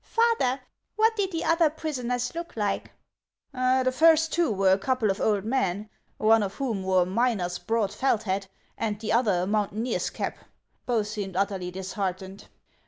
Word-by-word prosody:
" - - -42 0.2
Father, 450 - +3 0.4
what 445 +1 +3
did 395 -3 -1
the 330 -1 -2
other 330 -1 +4
prisoners 250 -6 -3
look 335 -6 -7
like? 205 -2 -1 0.3
" - - -65
" - - -53 0.3
The 255 - +2
first 325 +1 +5
two 340 -7 +2
were 195 -2 +3
a 190 - +5
couple 240 -1 +1
of 195 - -4
old 205 -2 +1
men, 215 -4 -1 0.3
one 220 +1 +4
of 200 0 -3
whom 235 -8 -2
wore 185 -1 +3
a - - -4
miner's 190 -3 0
broad 225 -3 -1
felt 230 -2 +1
hat, 195 -1 -2 0.3
and 210 -2 -2
the 220 -1 -2
other 210 -7 +2
a - - 0
moun 210 +1 +1
taineer's 225 +4 -2
cap; - - -4 0.5
both 230 -4 +1
seemed 205 -3 -5
utterly 190 -2 -1
disheartened. 190 +1 -5
220 Hz, 185 wpm, -26 LUFS, 195-260 Hz, 0.5 s, first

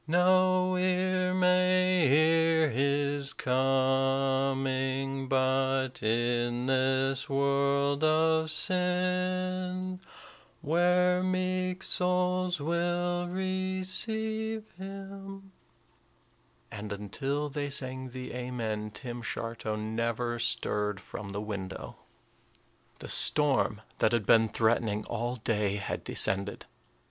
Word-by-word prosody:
No 185 +2 +3
ear 185 0 +1
may 185 -1 +3
hear 160 +1 +4
his 140 +2 0
coming, 135 0 0
But 130 0 +1
in 120 +2 0
this 130 0 +1
world 140 +1 +1
of 160 0 +3
sin 185 +1 -1 0.6
Where 180 +3 +2
meek 185 0 -1
souls 180 -1 0
will 175 +3 -1
receive 190 +4 -2
him" 195 +1 -9 1.2
and 105 0 -7
until 135 +9 -3
they 145 0 -3
sang 130 -1 -2
the 125 0 -7
"Amen," 115 -4 -4
Tim 120 +3 -7
Shartow 115 -1 -4
never 115 +2 -2
stirred 105 -3 -1
from 100 -1 -8
the 100 +1 -4
window. 100 -3 -6 1.0
The - - -9
storm 135 -7 +3 0.2
that 110 - +2
had 115 -4 +1
been 110 +2 +5
threatening 110 -1 0
all 120 +1 -3
day 105 -4 -1
had 100 - -4
descended. 100 +1 +1
140 Hz, 90 wpm, -29 LUFS, 120-180 Hz, 1.2 s, been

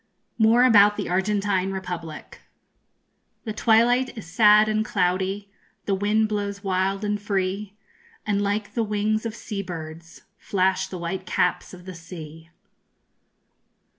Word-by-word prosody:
MORE 225 +3 +5
ABOUT 210 -4 +6
THE - - -3
ARGENTINE 195 0 0
REPUBLIC. 180 -4 -7 1.0
The 220 - -4
twilight 235 +4 +2
is 220 - -7
sad 210 +3 +5
and 215 0 +1
cloudy, 190 +1 -1 0.3
The 200 - 0
wind 210 +3 +1
blows 205 -1 -4
wild 195 +1 -1
and 205 0 -2
free, 200 0 -2 0.5
And 205 -2 0
like 205 +1 -2
the 235 - 0
wings 215 +1 -1
of 225 - -7
sea 210 -3 -5
birds 165 -2 -9 0.2
_Flash 190 0 0
the 185 - -6
white 180 +2 -5
caps 180 0 0
of 180 -1 -13
the 185 - -7
sea. 165 -2 -11
200 Hz, 135 wpm, -24 LUFS, 185-210 Hz, 1.0 s, ABOUT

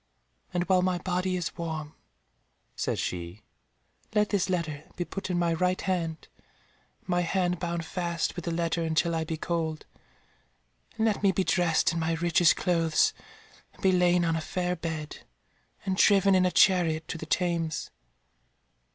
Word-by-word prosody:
"And 175 -1 0
while 185 0 +3
my 180 -1 +1
body 185 +1 -1
is 175 - -4
warm," 160 -3 -4 0.8
said - - -1
she, 85 +3 -4 0.7
"let 210 0 +3
this 200 -3 0
letter 155 -5 -2
be 175 - -3
put 195 +2 -6
in 180 - 0
my 170 -1 +1
right 180 +2 +1
hand, 170 -4 -2 0.7
and - - -33
my 175 -1 +1
hand 180 0 0
bound 170 -1 -3
fast 170 0 -2
with 175 - -6
the 170 - -1
letter 170 0 -1
until 165 +1 +1
I 160 -1 -1
be 160 0 -3
cold, 160 -1 -2 1.1
and 220 - +1
let 215 -3 +1
me 200 -2 +4
be 190 +1 0
dressed 170 -3 +2
in 170 - -2
my 165 0 0
richest 170 0 +4
clothes 165 -3 +2 0.6
and - - -19
be 190 - +5
lain 180 -1 +3
on 165 -1 +1
a 165 - -1
fair 180 +2 -2
bed, 160 -3 -5 0.7
and 190 -1 -1
driven 195 -1 +5
in 185 -1 +4
a - - -1
chariot 165 -5 +3
to 165 - -4
the 160 - -7
Thames. 170 -2 -1
175 Hz, 170 wpm, -28 LUFS, 165-180 Hz, 1.1 s, be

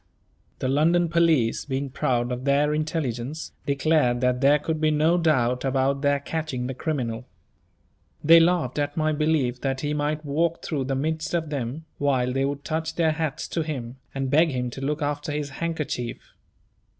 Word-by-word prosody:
The - - -2
London 165 +5 +3
police, 165 -9 +2
being 135 -1 -3
proud 125 -1 0
of 125 +1 -3
their 145 +2 +2
intelligence, 150 -3 -3 0.2
declared 140 -3 +2
that 125 0 +1
there 140 +2 +6
could 155 +1 -3
be 155 - +3
no 155 +3 +3
doubt 125 -7 +2
about 135 +1 +1
their 145 -1 +2
catching 140 -4 -3
the 130 - -3
criminal. 125 -5 -3 1.0
They 165 +2 +8
laughed 165 -6 +2
at 145 +1 -2
my 155 0 +2
belief 150 -5 0
that 135 -1 -1
he 150 0 -1
might 150 +1 -1
walk 165 +4 0
through 140 -5 -2
the 135 0 -1
midst 160 +4 -1
of 160 -3 -2
them, 140 +3 -4
while 130 -3 +1
they 135 +1 +1
would 140 0 -3
touch 160 0 -3
their 165 -2 +2
hats 155 -1 -3
to 165 - -1
him, 130 -6 -5 0.2
and 135 -1 -2
beg 160 +3 +5
him 125 -3 -2
to 135 - -8
look 150 +2 -1
after 145 +1 -2
his 145 -1 -3
handkerchief. 150 -6 -4
145 Hz, 175 wpm, -25 LUFS, 130-155 Hz, 1.0 s, They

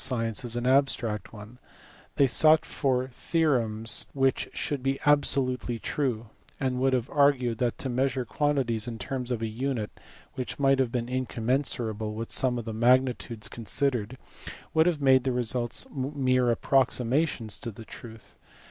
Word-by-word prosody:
science 115 -2 0
as 120 -1 -4
an 120 0 -2
abstract 125 -6 +1
one: 110 +3 -12 0.6
they 140 - +4
sought 155 +5 +4
for 130 -2 -1
theorems 120 -7 +1
which 135 -1 0
should 145 -3 -3
be 135 +1 -1
absolutely 130 -4 +2
true, 120 -2 -2 0.3
and 130 -2 -1
would 135 +1 +2
have 125 -2 0
argued 130 -5 +2
that 120 -2 0
to - - -4
measure 130 0 -1
quantities 125 -4 0
in 115 -2 -5
terms 125 +2 -4
of 120 -3 -2
a - - 0
unit 115 -1 -3 0.4
"which 130 - -5
might 135 -1 +3
have 130 -3 +1
been 120 -1 -2
incommensurable 120 -3 -2
with 115 +1 -6
some 125 -2 +2
of 120 - -5
the 110 - -5
magnitudes 120 -1 +1
considered 120 0 -2 0.6
would 160 +1 +4
have 155 -5 0
made 130 -2 +5
their 130 -1 0
results 120 0 -1
mere 130 -2 0
approximations 125 -1 +1
to 125 - -5
the 110 +1 -11
truth. 110 -3 -12
125 Hz, 155 wpm, -27 LUFS, 115-135 Hz, 0.6 s, made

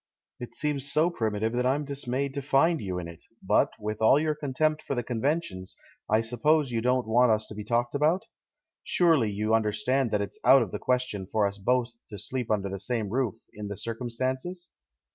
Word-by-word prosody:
"It 120 - -8
seems 140 -2 0
so 155 +4 +3
primitive 110 -5 -1
that 125 +1 0
I'm 145 +3 0
dismayed 140 -1 -2
to 140 - -3
find 145 +4 +2
you 95 -3 -3
in 90 -2 -5
it; 85 -1 -11 0.2
but, - - +3
with 105 +1 -5
all 120 +6 +6
your 155 0 +1
contempt 150 +1 0
for 140 - -3
the 120 - -1
conventions, 120 - -2 0.3
I 110 +1 +4
suppose 140 +5 +1
you 115 -1 -1
don't 125 +1 +1
want 120 +2 +4
us 110 0 +2
to - - -7
be 105 0 -6
talked 120 +2 0
about? 155 +6 +1 0.6
Surely 160 -11 +3
you 105 +2 -1
understand 115 +4 +1
that 105 -1 0
it's 100 - -8
out 135 -2 +7
of 100 - -7
the - - -4
question 125 -7 -1
for 105 +1 +1
us 100 0 -3
both 125 +4 +1 0.2
to 105 - -7
sleep 120 +4 -4
under 100 -2 0
the 100 0 -5
same 110 -1 -1
roof, 125 0 -1 0.2
in 105 0 -7
the 100 -1 -5
circumstances?" 130 - -3
120 Hz, 200 wpm, -27 LUFS, 105-140 Hz, 0.6 s, out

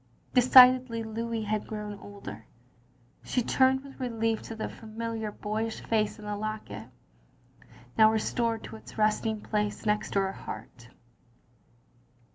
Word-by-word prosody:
Decidedly 250 -2 +7
Louis 225 0 -3
had 215 0 -2
grown 210 -1 -6
older. 110 - -10 0.8
She 250 - 0
turned 265 +2 +3
with 275 0 -13
relief 225 -3 -1
to 225 - -7
the 220 - -3
familiar, 225 -1 -5
boyish 220 +2 -3
face 215 -1 0
in 210 - -11
the 210 0 -2
locket; 205 - -5 1.1
now 220 0 +8
restored 225 +1 0
to - - -8
its - - -14
resting 215 0 +1
place 210 0 -2
next 210 0 0
her 195 -1 +2
heart. 115 - -9
220 Hz, 125 wpm, -29 LUFS, 210-230 Hz, 1.1 s, now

